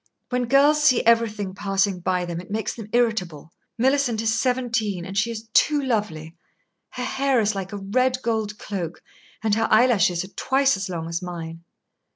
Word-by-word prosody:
When 250 Hz, -1 st, 0 dB
girls 285 Hz, +4 st, +4 dB
see 255 Hz, -6 st, +4 dB
everything 215 Hz, -4 st, +2 dB
passing 195 Hz, -1 st, 0 dB
by 180 Hz, 0 st, -1 dB
them, 170 Hz, 0 st, -5 dB
it 180 Hz, -, -15 dB
makes 215 Hz, +1 st, -2 dB
them 220 Hz, -3 st, -9 dB
irritable. 185 Hz, -11 st, -1 dB, 0.3 s
Millicent 260 Hz, -2 st, +2 dB
is 220 Hz, -1 st, +1 dB
seventeen, 230 Hz, -6 st, -1 dB
and 195 Hz, -, -7 dB
she 215 Hz, +4 st, +1 dB
is 225 Hz, -1 st, -6 dB
too 300 Hz, -1 st, +4 dB
lovely. 205 Hz, -, -2 dB, 0.5 s
Her 250 Hz, -, -6 dB
hair 270 Hz, 0 st, +1 dB
is 215 Hz, -1 st, +1 dB
like 195 Hz, 0 st, -5 dB
a 205 Hz, -, -5 dB
red 255 Hz, +6 st, 0 dB
gold 220 Hz, -2 st, -2 dB
cloak, 180 Hz, -6 st, -6 dB, 0.4 s
and 220 Hz, -2 st, +1 dB
her 225 Hz, +1 st, +2 dB
eyelashes 215 Hz, -7 st, +3 dB
are 190 Hz, -, -10 dB
twice 270 Hz, +6 st, +1 dB
as 195 Hz, -1 st, -4 dB
long 165 Hz, -2 st, -4 dB
as 170 Hz, +2 st, -3 dB
mine." 165 Hz, -2 st, -7 dB
215 Hz, 180 wpm, -23 LUFS, 185-245 Hz, 0.5 s, girls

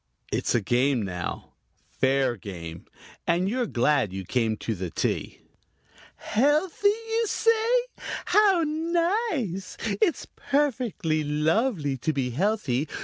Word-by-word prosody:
It's -, -, 0 dB
a 120 Hz, -, +3 dB
game 125 Hz, +3 st, +2 dB
now 90 Hz, -3 st, -5 dB, 0.5 s
fair 130 Hz, -1 st, +2 dB
game 85 Hz, -5 st, -8 dB, 0.4 s
and 175 Hz, +2 st, +2 dB
you're 245 Hz, +3 st, 0 dB
glad 120 Hz, -, +2 dB
you 95 Hz, 0 st, -5 dB
came 110 Hz, +1 st, 0 dB
to 115 Hz, -, -3 dB
the 95 Hz, -3 st, -4 dB
tea! -, -, -2 dB, 0.7 s
"Healthy, 300 Hz, -, +1 dB
you 450 Hz, +2 st, +1 dB
say? 450 Hz, +1 st, +2 dB, 0.6 s
How 395 Hz, -5 st, +4 dB
nice. 325 Hz, -, -1 dB, 0.2 s
It's 385 Hz, -7 st, +2 dB
perfectly 245 Hz, -, -1 dB
lovely 150 Hz, -, +1 dB
to 155 Hz, +6 st, -1 dB
be 130 Hz, -3 st, -1 dB
healthy. 155 Hz, -, 0 dB
170 Hz, 115 wpm, -26 LUFS, -, 0.7 s, How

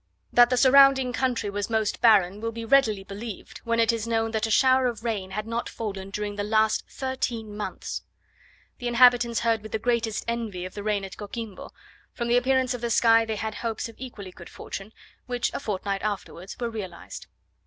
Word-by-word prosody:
That 240 Hz, 0 st, +7 dB
the 250 Hz, -, +1 dB
surrounding 265 Hz, -1 st, +6 dB
country 250 Hz, -5 st, 0 dB
was 205 Hz, +1 st, -3 dB
most 220 Hz, -2 st, 0 dB
barren 205 Hz, -4 st, +4 dB
will 230 Hz, 0 st, -2 dB
be 230 Hz, 0 st, -6 dB
readily 225 Hz, -6 st, +3 dB
believed, 200 Hz, +2 st, -8 dB
when 230 Hz, 0 st, +1 dB
it 230 Hz, 0 st, +4 dB
is 230 Hz, -1 st, -3 dB
known 225 Hz, -1 st, 0 dB
that 220 Hz, 0 st, 0 dB
a -, -, -5 dB
shower 260 Hz, +3 st, +4 dB
of 230 Hz, -2 st, -4 dB
rain 210 Hz, -5 st, -2 dB
had 215 Hz, +2 st, -4 dB
not 230 Hz, +1 st, -3 dB
fallen 195 Hz, -3 st, -5 dB
during 205 Hz, 0 st, -4 dB
the 205 Hz, -, -1 dB
last 215 Hz, +1 st, +2 dB
thirteen 240 Hz, -5 st, -4 dB
months. 210 Hz, -, -5 dB, 0.8 s
The 245 Hz, -, -3 dB
inhabitants 240 Hz, -1 st, +5 dB
heard 230 Hz, -2 st, +1 dB
with 215 Hz, -, -10 dB
the -, -, +2 dB
greatest 230 Hz, -1 st, -1 dB
envy 225 Hz, -6 st, -3 dB
of 185 Hz, -, -8 dB
the 205 Hz, -, -6 dB
rain 205 Hz, -1 st, -1 dB
at 190 Hz, -, -10 dB
Coquimbo; 210 Hz, -1 st, -7 dB, 0.4 s
from 235 Hz, -1 st, -3 dB
the 240 Hz, -, +4 dB
appearance 260 Hz, 0 st, +2 dB
of 245 Hz, -, -6 dB
the 235 Hz, -, -1 dB
sky 230 Hz, 0 st, +5 dB
they 220 Hz, -1 st, -3 dB
had 220 Hz, +1 st, -3 dB
hopes 225 Hz, +1 st, -3 dB
of 230 Hz, -, -13 dB
equally 220 Hz, -7 st, -8 dB
good 170 Hz, -1 st, -12 dB
fortune, 195 Hz, +2 st, -8 dB, 0.4 s
which, 245 Hz, -1 st, -1 dB
a -, -, -3 dB
fortnight 200 Hz, -5 st, -3 dB
afterwards, 200 Hz, -3 st, -5 dB
were 235 Hz, -1 st, -2 dB
realized. 190 Hz, -6 st, -8 dB
225 Hz, 200 wpm, -26 LUFS, 205-240 Hz, 0.8 s, That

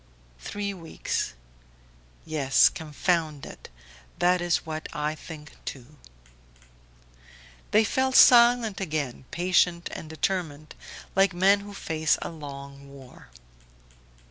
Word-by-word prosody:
"Three 200 Hz, -, -4 dB
weeks... 165 Hz, -, -4 dB, 0.9 s
Yes, 140 Hz, -4 st, +4 dB
confound 155 Hz, -1 st, -2 dB
it! -, -, -12 dB, 0.5 s
That 180 Hz, 0 st, +2 dB
is 175 Hz, 0 st, 0 dB
what 155 Hz, 0 st, -6 dB
I 150 Hz, -1 st, -2 dB
think 150 Hz, -1 st, -11 dB
too." 135 Hz, +2 st, -9 dB, 1.7 s
They 215 Hz, -, +4 dB
fell 260 Hz, +4 st, 0 dB
silent 235 Hz, -5 st, +6 dB
again, 150 Hz, -8 st, -3 dB
patient 175 Hz, -1 st, +1 dB
and 155 Hz, -, -8 dB
determined, 160 Hz, -3 st, -3 dB, 0.4 s
like 195 Hz, -1 st, +3 dB
men 195 Hz, +3 st, +4 dB
who 200 Hz, 0 st, -10 dB
face 160 Hz, -4 st, 0 dB
a -, -, -4 dB
long 140 Hz, -3 st, -10 dB
war. 135 Hz, -2 st, -15 dB
160 Hz, 105 wpm, -26 LUFS, 150-190 Hz, 1.7 s, silent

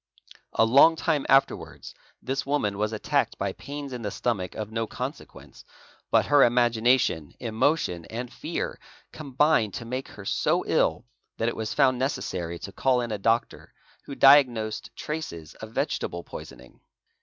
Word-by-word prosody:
A 110 Hz, -, +4 dB
long 140 Hz, +8 st, +6 dB
time 160 Hz, -4 st, -1 dB
afterwards 135 Hz, 0 st, +1 dB, 0.3 s
this 135 Hz, +1 st, -2 dB
woman 105 Hz, -8 st, -1 dB
was 105 Hz, 0 st, 0 dB
attacked 110 Hz, -, -1 dB
by -, -, -2 dB
_ -, -, -30 dB
pains 140 Hz, -1 st, -7 dB
in 125 Hz, -, -5 dB
the 105 Hz, -, -3 dB
stomach 100 Hz, -5 st, -2 dB
of 110 Hz, -1 st, -5 dB
no 115 Hz, 0 st, -2 dB
consequence, -, -, -8 dB, 0.5 s
but -, -, +3 dB
her 145 Hz, -1 st, +5 dB
imagination, 120 Hz, -, +2 dB
emotion, 110 Hz, -, 0 dB
and 120 Hz, +2 st, -6 dB
fear, -, -, -4 dB, 0.3 s
combined 140 Hz, -6 st, +1 dB
to 115 Hz, -, -6 dB
make 130 Hz, +3 st, -4 dB
her 100 Hz, -, -12 dB
so -, -, +1 dB
ill 115 Hz, -, +1 dB, 0.3 s
that 115 Hz, -, 0 dB
it -, -, -5 dB
was 110 Hz, 0 st, -4 dB
found 130 Hz, -3 st, +3 dB
necessary 90 Hz, -, -3 dB
to 100 Hz, -, -8 dB
call: 130 Hz, +4 st, +1 dB
ina 110 Hz, -3 st, -4 dB
doctor 115 Hz, +3 st, -1 dB, 0.3 s
who 140 Hz, -, -7 dB
diagnosed 125 Hz, -7 st, +4 dB
traces 85 Hz, -, -6 dB
of 110 Hz, -, -7 dB
vegetable 85 Hz, -5 st, -2 dB
poisoning. 65 Hz, 0 st, -11 dB
120 Hz, 155 wpm, -26 LUFS, 105-135 Hz, 0.5 s, long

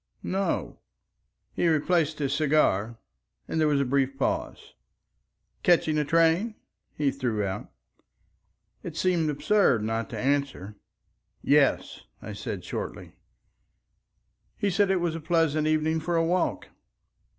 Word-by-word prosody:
"No." 195 Hz, +1 st, -2 dB, 0.7 s
He 175 Hz, -, +1 dB
replaced 160 Hz, 0 st, +1 dB
his 140 Hz, -2 st, -1 dB
cigar, 140 Hz, -8 st, +1 dB, 0.5 s
and 160 Hz, -, -1 dB
there 155 Hz, -, +4 dB
was 145 Hz, -2 st, +2 dB
a 140 Hz, -, +1 dB
brief 135 Hz, +1 st, 0 dB
pause. 135 Hz, -, -3 dB, 0.9 s
"Catching 160 Hz, -3 st, +3 dB
a -, -, +2 dB
train?" 165 Hz, +8 st, +2 dB, 0.4 s
he 145 Hz, -2 st, +1 dB
threw 120 Hz, -6 st, -2 dB
out. 95 Hz, +1 st, -5 dB, 1.1 s
It 165 Hz, -2 st, -8 dB
seemed 170 Hz, -3 st, +1 dB
absurd 150 Hz, -, +2 dB
not 115 Hz, +3 st, -2 dB
to 120 Hz, -, -6 dB
answer. 135 Hz, -5 st, -1 dB, 0.7 s
"Yes," -, -, +2 dB, 0.2 s
I -, -, -8 dB
said -, -, -5 dB
shortly. -, -, -6 dB, 1.5 s
He 200 Hz, -, 0 dB
said 200 Hz, +2 st, +2 dB
it 190 Hz, -, +3 dB
was 170 Hz, -2 st, 0 dB
a 165 Hz, -, -5 dB
pleasant 155 Hz, -2 st, +1 dB
evening 155 Hz, +1 st, +1 dB
for 170 Hz, +2 st, -2 dB
a 165 Hz, 0 st, +2 dB
walk. 180 Hz, +2 st, -1 dB
155 Hz, 130 wpm, -26 LUFS, 135-170 Hz, 1.5 s, there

